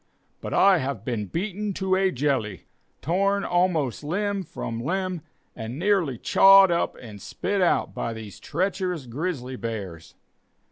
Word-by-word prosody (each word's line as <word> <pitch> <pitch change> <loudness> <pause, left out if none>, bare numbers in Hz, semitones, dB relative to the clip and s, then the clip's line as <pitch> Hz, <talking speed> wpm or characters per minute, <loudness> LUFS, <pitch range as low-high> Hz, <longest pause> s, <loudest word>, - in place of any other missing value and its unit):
But - - -6
I 195 -3 +5
have 140 0 -4
been 115 -6 -2
beaten 200 - -3
to 190 0 -1
a 190 0 +3
jelly, 125 - -1 0.4
torn 200 +5 +1
almost 170 - 0
limb 200 +5 -1
from 115 -9 -6
limb, 185 +2 -2 0.3
and 115 +3 -6
nearly 180 - +1
chawed 195 +7 +6
up 170 - 0
and 105 -4 -11
spit 195 - -2
out 175 - +2
by 115 - -3
these 110 -3 -9
treacherous 180 -2 -2
grizzly 130 -1 -4
bears. 100 -9 -6
170 Hz, 140 wpm, -25 LUFS, 120-190 Hz, 0.4 s, chawed